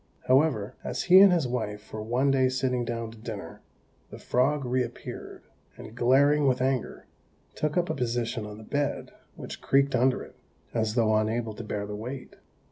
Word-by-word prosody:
However, 130 -6 +2
as - - -3
he 185 +1 +8
and 195 -1 +8
his 165 -7 +2
wife 110 -4 -4
were 110 - -4
one 125 +5 +1
day 130 -1 +3
sitting 130 -1 0
down 115 -1 -4
to 115 - -14
dinner, 105 -7 -8 0.5
the - - -9
frog 135 +3 +1
reappeared, 125 -1 -4 0.3
and - - -10
glaring 140 +4 +4
with 130 -1 +2
anger, 130 -2 -1 0.5
took 150 +3 -2
up 175 0 +2
a - - -1
position 120 -4 -2
on 105 0 -9
the 110 - -11
bed, 145 +5 -2 0.2
which - - -8
creaked 140 0 +2
under 130 +1 +2
it, - - -14 0.4
as 110 -1 0
though 110 -3 +3
unable 110 +1 0
to 115 - -8
bear 105 -1 -3
the 105 0 -6
weight. 125 +5 -7
125 Hz, 180 wpm, -27 LUFS, 110-135 Hz, 0.5 s, he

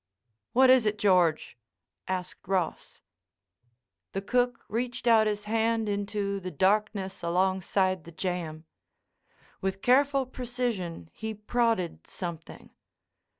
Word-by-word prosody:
"What 260 +1 +6
is 255 -4 +5
it, 210 0 0
George?" 180 -10 +2 0.5
asked 185 0 -4
Ross. 185 - -2 1.1
The 195 - -2
cook 245 +2 0
reached 240 +2 -3
out 225 -2 +5
his 210 -1 -2
hand 225 +1 +1
into 200 -1 -2
the 185 -1 -5
darkness 195 +3 0
alongside 185 +1 +1
the 170 - -11
jamb. 165 -2 -4 1.0
With 190 0 -2
careful 275 +1 +4
precision 240 - -4
he 220 0 -5
prodded 215 -4 -1
something. 170 -3 -7
200 Hz, 105 wpm, -28 LUFS, 185-230 Hz, 1.1 s, What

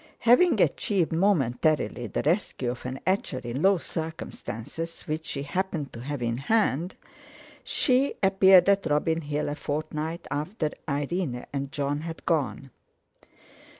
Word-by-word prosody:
Having 250 +10 +5
achieved—momentarily—the 155 - +1
rescue 150 - 0
of 125 0 -7
an 130 +1 -5
etcher 185 -7 0
in 125 +2 -4
low 195 +1 +5
circumstances, 160 -2 -6
which 155 0 -4
she 140 - -3
happened 160 -1 -3
to 115 - -8
have 135 +1 -4
in 115 0 -1
hand, 175 - +1 0.7
she 265 +1 +2
appeared 190 -1 +6
at 200 -3 +3
Robin 160 +2 +1
Hill 150 0 -2
a 145 - -1
fortnight 155 +2 -4
after 155 +2 -2 0.2
Irene 145 -2 -2
and 140 -1 -3
Jon 145 0 -1
had 165 0 -7
gone. 135 -5 -1
155 Hz, 125 wpm, -27 LUFS, 140-180 Hz, 0.7 s, appeared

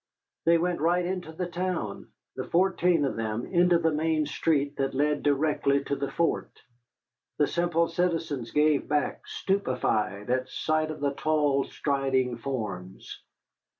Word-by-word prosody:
They 170 +1 +5
went 175 +1 0
right 175 +2 +2
into 180 -2 -3
the 180 +3 -3
town, 175 - -3 0.3
the - - -4
fourteen 175 -3 +2
of 135 - -2
them, 110 +1 -2
into 175 -1 +4
the 165 -1 +1
main 155 0 +1
street 145 -2 0
that 135 -1 -1
led 145 +1 +1
directly 140 -1 +2
to 140 - -2
the 140 0 -3
fort. 170 -1 0 0.9
The 150 - +4
simple 170 +1 +1
citizens 165 -8 -1
gave 150 +2 +2
back, 150 0 -1
stupefied, 120 - -1
at 130 0 0
sight 155 0 0
of 155 - -6
the 140 -1 0
tall, 145 -2 +1
striding 135 -3 0
forms. 105 -8 -5
150 Hz, 145 wpm, -27 LUFS, 135-170 Hz, 0.9 s, They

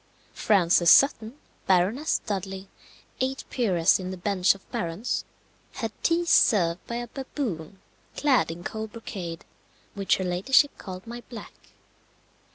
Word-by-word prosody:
Frances 175 -4 +3
Sutton, 245 -4 +5 0.3
Baroness 195 - +2
Dudley, 195 -1 -4 0.5
eighth 265 +1 -2
peeress 190 -9 +2
in 185 -1 -5
the 185 - -6
bench 190 0 +2
of 195 - -18
barons, 170 +8 -3 0.5
had 225 -3 -4
tea 340 +1 +1
served 180 - +3
by 235 - -4
a 240 0 -4
baboon 225 - -5 0.4
clad 280 -4 +2
in 170 +1 -7
cold 220 +1 -5
brocade, 180 -7 -7 0.5
which 200 -1 +1
her 190 - -3
ladyship 195 +11 +2
called 185 -1 -8
My 240 +1 -8
Black. 230 -4 -9
200 Hz, 130 wpm, -26 LUFS, 180-240 Hz, 0.5 s, Sutton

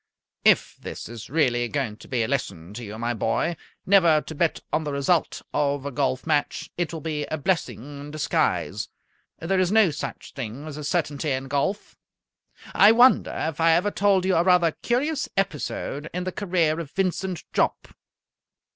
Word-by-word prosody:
"If - - +3
this - - -7
is 115 -1 -9
really 125 -5 +2
going 130 -4 -2
to - - -14
be 120 -3 0
a - - -1
lesson 100 -10 -3
to 120 +3 -7
you, 110 0 -7
my 120 +1 -1
boy, 115 +9 0 0.3
never 170 -5 +5
to 160 - -8
bet 160 +1 0
on 160 - +1
the 150 - -3
result 140 +5 0
of 145 -1 0
a 140 - -3
golf 130 -1 -1
match, 150 -3 -1
it 175 -3 -2
will 165 -2 -6
be 150 -1 -2
a 155 - -3
blessing 145 - -2
in 145 +1 -8
disguise. 155 0 -1 0.5
There 185 +4 0
is 185 0 +2
no 215 -5 +5
such 150 - -6
thing 130 +2 -6
as 155 -2 -7
a 150 - -6
certainty 150 -2 -1
in 130 0 -2
golf. 145 +9 -2 0.8
I 205 - +7
wonder 245 +3 +5
if 160 0 -4
I 165 0 +5
ever 180 +5 +2
told 195 -2 +2
you 190 - +2
a - - +5
rather 180 -2 +4
curious 275 - -1
episode 160 -4 -2
in 180 - -1
the 185 - -3
career 170 -5 0
of 165 -4 -5
Vincent 185 0 -2
Jopp?" - - 0
155 Hz, 180 wpm, -25 LUFS, 140-180 Hz, 0.8 s, I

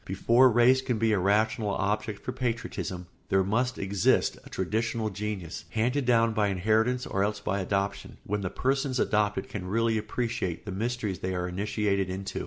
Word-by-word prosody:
Before 115 +7 +4
race 125 +3 +5
can 130 -3 -1
be 110 0 +2
a 105 - +2
rational 105 +3 +2
object 105 +1 -2
for - - -2
patriotism 115 -7 -3 0.2
there 95 0 +3
must 125 +6 0
exist 95 -1 +2
a - - -13
traditional 110 +3 -1
genius, 95 -5 -5
handed 125 +7 0
down 115 -2 +3
by 105 -2 +2
inheritance 110 +6 +1
or 95 - 0
else 105 0 -1
by 100 -1 -2
adoption, 100 +1 -2
when 105 +1 -2
the 95 - -2
persons 135 +2 0
adopted 105 -1 +1
can 95 -3 -6
really 115 +2 +1
appreciate 110 -5 -3
the 100 - -5
mysteries 110 -1 -2
they 95 0 -2
are 90 0 -2
initiated 100 0 -1
into. 95 +1 -4
105 Hz, 175 wpm, -28 LUFS, 95-115 Hz, 0.2 s, race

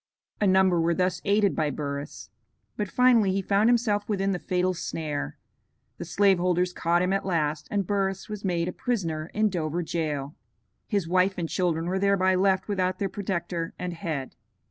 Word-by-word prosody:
A 205 - +4
number 190 -2 +4
were 170 +1 +2
thus 180 0 0
aided 200 -1 +3
by 155 -1 +1
Burris. 140 0 -5 0.4
But 210 - -2
finally 240 -5 +4
he 195 - 0
found 205 +4 +3
himself 220 -4 +1
within 195 -1 0
the 180 - -2
fatal 180 +1 0
snare; 155 -4 -4 0.6
the - - -5
slave 195 -2 +3
holders 180 0 +1
caught 175 +1 +1
him 185 +1 +1
at 195 - 0
last, 155 -5 -1
and 200 -2 0
Burris 195 0 -1
was 210 -2 -6
made 175 -3 0
a - - -1
prisoner 165 -10 -2
in 215 +1 +3
Dover 170 -2 -2
jail. 150 -3 -3 0.5
His 200 -6 -1
wife 185 +2 +2
and 170 -2 -2
children 165 -2 0
were 185 +2 -1
thereby 195 -1 +3
left 190 0 +2
without 185 -3 0
their 195 0 -1
protector 180 -3 -3
and 180 -1 -4
head. 155 -5 -4
185 Hz, 180 wpm, -26 LUFS, 170-195 Hz, 0.6 s, A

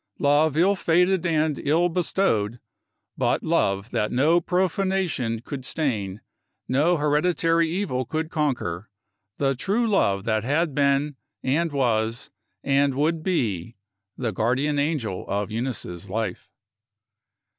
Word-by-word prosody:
Love 145 +1 +3
ill 190 +4 +4
fated 180 0 +2
and 155 -2 +1
ill 165 +5 +2
bestowed 160 - 0 0.6
but - - +1
love 100 +3 0
that 105 - 0
no 155 +7 +3
profanation 180 - 0
could 130 +1 -7
stain, 110 -11 -2
that 105 - -18 0.5
no 160 +6 +3
hereditary 165 +2 +2
evil 165 -8 -1
could 155 +5 -3
conquer 115 - -2 0.5
the 135 -1 +1
True 200 - 0
Love 100 - +2
that 110 -1 0
had 150 +5 0
been, 140 0 +1 0.3
and 155 +5 +1
was, 115 -4 0 0.3
and 140 -1 +2
would 155 +3 +1
be, 115 - -1 0.4
the 120 -3 -2
guardian 130 +8 0
angel 140 - -1
of 100 +1 -2
Eunice's 110 -8 -4
life. 105 -1 -3
145 Hz, 125 wpm, -24 LUFS, 115-165 Hz, 0.6 s, ill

